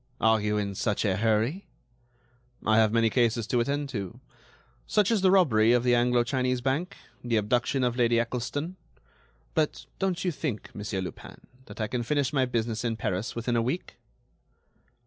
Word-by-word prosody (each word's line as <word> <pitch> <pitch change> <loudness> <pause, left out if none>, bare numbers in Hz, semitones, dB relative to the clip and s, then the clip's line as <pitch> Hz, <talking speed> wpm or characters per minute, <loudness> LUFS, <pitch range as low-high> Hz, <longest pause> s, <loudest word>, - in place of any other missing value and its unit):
"Are 110 -1 +3
you 105 0 0
in 100 -1 -2
such 105 +3 -1
a 95 -3 +2
hurry?" 115 - 0 1.0
"I 110 0 +4
have 110 -1 +4
many 115 -1 +2
cases 120 -2 +2
to 120 +2 0
attend 140 +4 -1
to; 100 -8 -5 0.7
such 210 0 +2
as 220 -4 +2
the 190 - +5
robbery 120 - +4
of 120 -1 +3
the 125 -1 +3
Anglo 120 0 +3
Chinese 125 0 0
Bank, 135 +9 -2 0.3
the 120 -1 0
abduction 120 +5 +1
of 120 -1 +1
Lady 120 -1 +3
Eccleston.... 125 +9 -3 0.8
But, 155 -2 -1
don't 190 -2 -1
you 180 - +2
think, 140 -8 -5
Monsieur 105 -2 -4
Lupin, 90 - -9 0.2
that - - -12
I 110 - 0
can 120 +3 -2
finish 140 +3 0
my 135 -2 +3
business 115 -2 -2
in 115 -2 -1
Paris 95 +1 -3
within 120 +1 -1
a 115 - +3
week?" 130 +10 -3
120 Hz, 175 wpm, -27 LUFS, 110-135 Hz, 1.0 s, the